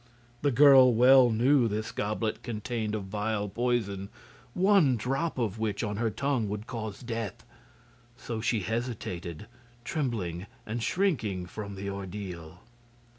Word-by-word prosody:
The 145 - +2
girl 135 -1 +7
well 125 +1 +7
knew 120 +3 +3
this 110 +1 -3
goblet 110 +1 -2
contained 110 -1 -3
a - - -1
vile 105 +1 -2
poison, 105 -3 -1 0.5
one 185 -9 +4
drop 135 +9 -2
of 110 -4 -2
which 105 -1 -1
on 105 -2 -2
her 115 +1 +1
tongue 130 -2 -1
would 105 +1 -4
cause 110 -4 -6
death; 115 -5 -5 0.7
so 115 -4 -5
she 115 -1 +1
hesitated, 100 -5 -4 0.4
trembling 100 - -3 0.2
and 115 +2 -3
shrinking 110 - 0
from 100 +2 -7
the 100 +1 -6
ordeal. 95 -3 -7
110 Hz, 130 wpm, -29 LUFS, 100-125 Hz, 0.7 s, girl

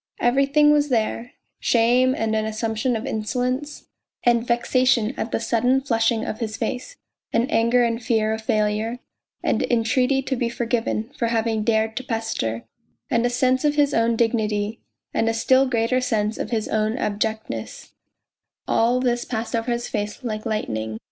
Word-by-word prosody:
Every 270 +3 +3
thing 295 +1 +5
was 295 -1 +3
there 230 0 -1 0.3
shame 250 +2 +3
and 220 -1 -1
an 215 - +1
assumption 220 +2 -1
of 225 +3 -4
insolence, 255 +4 -2 0.4
and 235 -1 +3
vexation 240 -1 +2
at 225 - -4
the - - 0
sudden 245 +3 +2
flushing 230 -3 +1
of 215 - -4
his 220 -2 -3
face, 250 - -4 0.4
and 235 +3 +1
anger 235 +2 +3
and 230 0 0
fear 220 -1 +1
of 220 - -4
failure, 215 +2 0 0.5
and - - +1
entreaty 250 +3 +1
to 265 - -1
be 240 -1 -1
forgiven 235 0 -2
for 235 -5 0
having 225 -1 0
dared 220 0 +1
to 260 - -2
pester, 225 - -2 0.5
and 235 +1 +2
a - - -1
sense 255 +1 +1
of 295 -1 +2
his 290 -1 +3
own 230 0 +2
dignity, 220 -2 0 0.3
and 225 - +1
a 225 - -1
still 260 +3 +3
greater 245 +1 +1
sense 220 -3 -1
of - - -3
his 220 -3 -1
own 215 +2 0
abjectness 220 0 -3 0.8
all 240 +2 +2
this 240 -1 0
passed 225 -1 -3
over 230 +1 -1
his 240 0 -2
face 210 +4 -4
like 215 -3 -3
lightning. 110 - -3
230 Hz, 170 wpm, -23 LUFS, 220-250 Hz, 0.8 s, thing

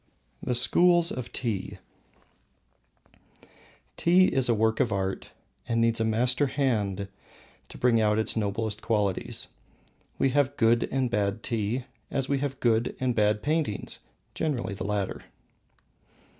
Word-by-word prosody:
II. - - -9
The 125 - +1
Schools 175 +7 +4
of 125 -2 -5
Tea. 110 -7 -3 2.2
Tea 180 +2 +4
is 130 -2 +1
a 115 - +4
work 110 +1 +1
of 115 - +2
art 95 -1 -2 0.4
and 115 0 +1
needs 115 0 +2
a - - +2
master 125 +5 +2
hand 105 -8 -1 0.6
to - - -11
bring 120 -2 +3
out 105 0 +2
its 110 - +1
noblest 110 0 -2
qualities. 105 -4 -1 0.7
We 135 - +2
have 140 0 +1
good 115 0 +3
and 130 -2 0
bad 105 -1 -1
tea, 115 +1 -1 0.3
as 135 -2 -1
we 140 0 0
have 135 -1 -3
good 115 -1 +1
and 130 -1 0
bad 105 -1 +1
paintings 150 -8 -1 0.3
generally 125 -9 -2
the 95 -1 -5
latter. 100 -2 -3
115 Hz, 140 wpm, -27 LUFS, 105-130 Hz, 2.2 s, Schools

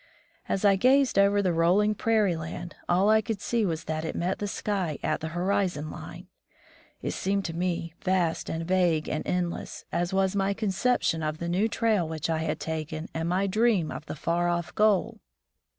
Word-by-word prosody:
As 195 - 0
I 195 -1 +5
gazed 260 0 +4
over 200 +1 +4
the 180 -2 +1
rolling 180 +6 +3
prairie 210 -4 +2
land, 165 +2 -6 0.2
all 180 +3 +3
I 220 0 +5
could 220 -3 -3
see 225 +1 0
was 160 -2 -2
that 155 0 -3
it 160 - -4
met 180 +2 -1
the 205 - -2
sky 190 -7 -2
at - - 0
the 160 - -3
horizon 180 -5 0
line. 170 +3 -9 0.8
It - - -1
seemed 195 0 -1
to 165 - -3
me 170 -2 -2
vast 180 -4 0
and 165 +1 -3
vague 175 -4 +2
and 155 - -2
endless, 180 -1 -3
as 175 0 -1
was 190 0 +1
my 195 0 +1
conception 210 -4 +1
of 155 0 -2
the 170 - -4
new 185 +6 +2
trail 210 -8 +1
which 160 0 -2
I 160 - 0
had 160 -1 -2
taken 155 0 -4
and 165 +1 -2
my 185 +3 +1
dream 210 -4 +2
of 155 - -7
the - - -5
far 170 +3 0
off 175 -1 -2
goal. 215 +1 +2
180 Hz, 195 wpm, -27 LUFS, 165-200 Hz, 0.8 s, I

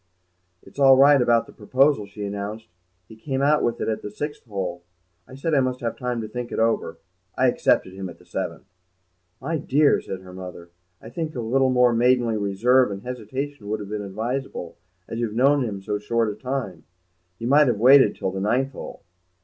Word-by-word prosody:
"It's - - -14
all 135 -1 +7
right 140 0 +6
about 120 -1 +3
the - - -15
proposal," 130 +1 +2
she 100 +1 -7
announced; 100 +2 -5 0.4
"he 110 - -13
came 135 +4 -3
out 150 +1 +3
with 120 - -1
it - - -2
at 110 -1 -2
the - - -6
sixth 145 +8 -6
hole. 95 -5 -4 0.5
I 130 - -12
said 155 +4 -2
I 145 - +5
must 130 -1 -1
have 115 -1 -2
time 125 -2 -3
to 110 - -5
think 120 +2 -6
it - - -4
over. 115 0 0 0.4
I - - +3
accepted 95 - +2
him 95 -1 -6
at 85 - -12
the - - -21
seventh." - - -5 0.7
"My 155 +5 -2
dear," 145 +2 +3
said 95 -1 -7
her 90 -1 -12
mother, 90 -2 -9 0.3
"I 115 - -12
think 155 +2 -4
a - - -3
little 130 +3 +1
more 125 -1 +4
maidenly 120 -1 +2
reserve 115 +6 +3
and 100 0 -6
hesitation 125 0 -6
would 110 0 -1
have 100 -1 -8
been 105 0 -3
advisable, 110 -1 -4 0.3
as 115 - -5
you've 115 -2 -2
known 135 +3 +4
him 100 -5 -5
so 105 +1 -2
short 115 +1 0
a - - -8
time. 110 - -4 0.5
You 115 - -6
might 145 +3 +5
have 120 -4 +1
waited 130 0 +6
till 95 - -3
the 95 0 -4
ninth 130 +7 +1
hole." 125 - -9
115 Hz, 205 wpm, -23 LUFS, 105-130 Hz, 0.7 s, all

